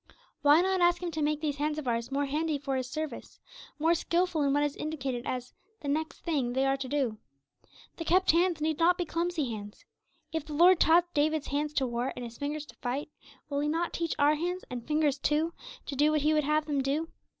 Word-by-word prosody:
Why 295 +3 +6
not 380 0 +1
ask 350 +1 +3
him 345 - -2
to 315 -1 -3
make 300 0 0
these 295 -2 -1
hands 300 +1 -1
of 300 -4 -5
ours 235 +1 -1
more 285 +1 0
handy 305 +2 -1
for 275 -1 -3
His 255 -1 -2
service, 310 +2 -6 0.4
more 320 +3 +3
skilful 345 0 0
in 280 -1 +2
what 290 +1 +2
is 290 -1 -1
indicated 270 -5 -4
as 250 -1 -4 0.3
the 290 - -6
'next 315 +3 -2
thynge' 270 -7 0
they 265 +1 +2
are 270 0 +2
to 270 -1 -5
do? 255 -7 -1 0.8
The 330 - -5
'kept' 370 +3 +4
hands 340 -1 +2
need 315 0 0
not 350 +2 +4
be 355 - -1
clumsy 335 -5 -1
hands. 205 -1 -8 0.5
If 320 -2 -1
the 305 0 -8
Lord 350 +4 +6
taught 345 +2 +4
David's 305 0 +1
hands 295 +1 -1
to 270 - +1
war 240 +1 -2
and 245 - -5
his 235 0 -10
fingers 295 +1 -3
to - - -15
fight, 270 +3 -3 0.4
will 280 -1 -2
He 295 - 0
not 335 +2 -1
teach 335 -1 -2
our 290 +1 +4
hands, 355 +4 -2
and 245 -2 -6
fingers 300 -2 +1
too, 310 +4 +1 0.3
to 280 - -5
do 295 +3 +4
what 305 -1 +2
He 305 +2 +3
would 300 -2 +2
have 305 +1 +2
them 290 -2 0
do? 290 +5 -1
300 Hz, 230 wpm, -29 LUFS, 275-325 Hz, 0.8 s, Why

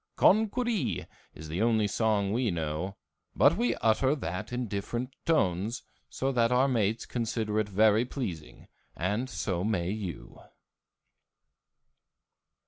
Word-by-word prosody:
Con 215 +2 +5
cur 250 +3 -2
ee 145 - -1 0.3
is 80 +2 -9
the 80 +6 -3
only 110 -2 +3
song 105 -1 +1
we 120 0 +1
know, 85 +3 -3 0.4
but 150 - +5
we 235 +5 +1
utter 130 +6 +2
that 105 - -5
in 125 -1 -2
different 120 +6 -4
tones, 110 - +1 0.3
so 135 +1 -1
that 120 -2 +2
our 125 +2 +4
mates 115 -3 0
consider 110 -2 -1
it 105 -1 -1
very 105 +3 +4
pleasing, 95 - -6 0.3
and 105 +9 -1
so 95 -7 -2
may 95 -4 0
you. 100 -5 -6
110 Hz, 135 wpm, -29 LUFS, 95-125 Hz, 0.4 s, Con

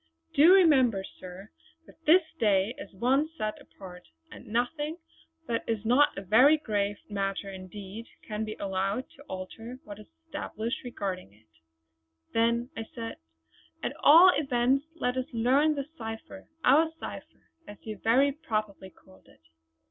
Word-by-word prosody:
Do 310 +5 +7
remember, 260 - +4 0.2
sir, 185 +3 -10 0.3
that 325 - -20
this 350 +4 +7 0.2
day 205 -1 +2
is - - -9
one 260 +10 +1
set 215 -4 -3
apart, 180 -2 -13 0.2
and - - -12
nothing 295 +8 -2 0.5
that 230 -1 -1
is 225 -1 -2
not 265 +6 +4
a 195 - -5
very 255 - +6
grave 205 -7 -2
matter 195 -1 -3
indeed 195 +4 -9 0.2
can 215 0 -3
be 215 0 -5
allowed 195 +5 -2
to 275 - -18
alter 225 +6 -7
what 205 0 -10
is 215 - -13 0.2
established 260 -7 -5
regarding 190 - -5
it." 110 +1 -26 0.9
"Then," 235 +2 +1 0.2
said 230 -1 -6 0.7
I, - - +1
"at - - -11
all 340 +5 +8
events 270 0 +1
let 250 -6 -1
us 255 - -2
learn 270 +7 +3
the 280 -1 -3
cipher 225 +5 -8 0.2
our 310 +5 +5
cipher - - -10 0.2
as 205 - -10
you 215 -2 -6
very 260 +5 +3
properly 215 -9 -4
called 185 +1 -22
it." - - -22
230 Hz, 150 wpm, -28 LUFS, 200-275 Hz, 0.9 s, all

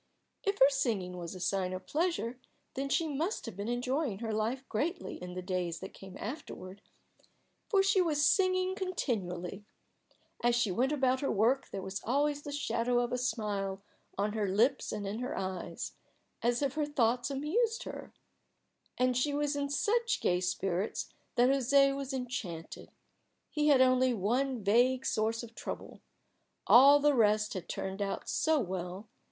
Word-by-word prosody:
If 400 0 0
her 270 - +7
singing 220 -10 -1
was 175 +1 -6
a - - -8
sign 185 0 0
of 185 - -6
pleasure, 305 -7 -1 0.3
then 275 +1 -3
she 325 +3 +1
must 310 +7 -2
have 230 - -7
been 200 +2 -4
enjoying 250 0 -1
her 220 0 -3
life 230 +5 -2
greatly 310 - -3
in 180 0 -7
the 185 - -4
days 180 -2 -2
that 190 - -8
came 190 -1 -11
afterward, 200 - -7 0.9
for 395 -3 +4
she 390 0 +4
was 300 -4 +2
singing 370 -1 +3
continually. 205 - -3 0.8
As 240 0 +4
she 240 -5 +2
went 255 +9 +1
about 260 -3 +2
her 275 - -1
work 235 +6 +2
there 195 - -5
was 190 +1 -5
always 285 +4 +1
the 290 - -7
shadow 245 -4 0
of 240 -1 -1
a - - +1
smile 200 -5 -2 0.3
on 205 +1 0
her 215 -2 0
lips 230 +8 +2
and 210 -1 -4
in 205 +3 -3
her 250 +1 -3
eyes, 185 -1 -4 0.5
as 240 +4 +1
if 275 -2 0
her 300 0 -1
thoughts 245 -4 +1
amused 415 - 0
her. - - -8 0.9
And 255 0 +2
she 285 +4 +1
was 290 0 0
in 285 0 -1
such 460 +10 +1
gay 180 0 +2
spirits 180 +2 -2 0.2
that 245 +1 +5
José 275 +1 +4
was 275 0 -4
enchanted. 235 -11 -5 0.6
He 300 0 +1
had 280 -3 +6
only 255 -1 +4
one 240 +4 0
vague 245 +6 +3
source 225 +2 0
of 230 -1 -10
trouble: - - -7 0.6
all 275 +4 +8
the 295 0 +4
rest 215 -3 +3
had 185 -3 -6
turned 190 +1 -4
out 200 -1 -3
so 315 -1 +2
well! 185 -1 -4
245 Hz, 170 wpm, -31 LUFS, 200-285 Hz, 0.9 s, all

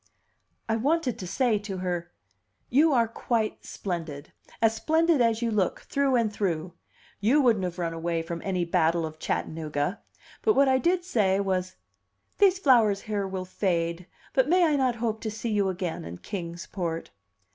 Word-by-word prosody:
I 225 0 +1
wanted 280 0 0
to 185 - -5
say 235 +1 +1
to 205 -2 -6
her, 175 -2 -3 0.6
"You 300 +6 +5
are 235 -4 +3
quite 225 -1 -2
splendid 160 -6 -5 0.3
as 225 -1 +4
splendid 320 +5 +2
as 230 0 +2
you 230 - 0
look, 200 -4 0
through 275 -2 +1
and 225 -3 +1
through! 175 -4 -2 0.5
You 235 +9 +3
wouldn't 230 -8 +3
have 175 0 -4
run 170 -2 -2
away 165 0 -2
from 170 0 -5
any 185 -3 -1
battle 170 -1 +2
of 155 0 -8
Chattanooga!" 155 +4 -2 0.4
But 435 - +3
what 275 0 +5
I 260 0 +4
did 350 +4 +1
say 200 - +2
was, 185 -2 -1 0.6
"These 390 -2 +5
flowers 230 - +4
here 205 -3 -2
will 190 -1 -4
fade, 170 -2 -1 0.3
but 260 +1 +3
may 360 +1 +5
I 305 -2 +2
not 260 -3 +1
hope 225 -1 -2
to 220 - -2
see 220 +2 -4
you 200 -2 +2
again 180 -2 -3
in 85 +2 -7
Kings 170 - -6
Port?" 170 -3 -4
205 Hz, 175 wpm, -27 LUFS, 175-245 Hz, 0.6 s, You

